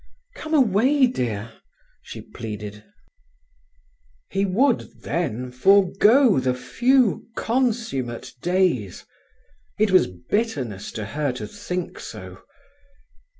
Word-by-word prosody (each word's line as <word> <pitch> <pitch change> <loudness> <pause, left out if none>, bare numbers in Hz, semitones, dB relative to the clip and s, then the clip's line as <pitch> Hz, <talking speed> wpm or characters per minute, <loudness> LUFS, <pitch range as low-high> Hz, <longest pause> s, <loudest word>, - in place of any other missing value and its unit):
"Come 315 -9 -3
away, 260 +2 +4
dear," 115 - -3 0.5
she - - -9
pleaded. 105 -2 -8 1.5
He 195 0 +1
would, 235 +7 0
then, 125 -7 -2
forgo 200 - +4
the 130 -1 0
few 245 - +2
consummate 220 - -1
days! 175 - 0 0.7
It 215 -1 +2
was 185 - +5
bitterness 120 - -3
to 110 - -4
her 145 +6 -2
to 130 - -6
think 180 -4 -5
so. - - -9
185 Hz, 95 wpm, -23 LUFS, -, 1.5 s, was